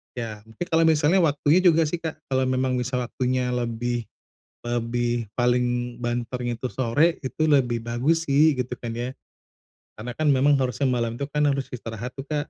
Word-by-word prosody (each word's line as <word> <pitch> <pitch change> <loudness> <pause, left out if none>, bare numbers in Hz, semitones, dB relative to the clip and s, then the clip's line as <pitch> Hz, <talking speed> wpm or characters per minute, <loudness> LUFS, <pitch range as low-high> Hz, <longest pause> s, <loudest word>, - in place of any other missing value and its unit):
Ya, 115 -4 -5
mungkin 115 +10 -6
kalau 165 0 +4
misalnya 160 +3 +4
waktunya 155 0 +3
juga 170 -3 +5
sih, 160 +2 -2
Kak, 160 -2 -4 0.2
kalau 130 0 +2
memang 130 0 0
bisa 125 +1 -2
waktunya 125 0 -1
lebih 120 -1 -2 0.5
lebih, 120 0 -1
paling 120 0 0
banternya 120 0 -2
itu 125 +2 -4
sore 130 - +2
itu 155 +4 0
lebih 125 -5 +2
bagus 135 +8 0
sih, 150 +3 +5
gitu 125 -2 -3
kan 115 -1 -5
ya. 120 +2 -3 0.8
Karena 120 +3 -8
kan 150 -2 +3
memang 140 +2 +4
harusnya 130 +1 0
malam 120 -2 0
tuh 140 +4 -5
kan 150 0 +1
harus 140 -2 0
istirahat 115 -1 -6
tuh, 135 - -6
Kak. 150 0 -3
125 Hz, 175 wpm, -24 LUFS, 120-145 Hz, 0.8 s, juga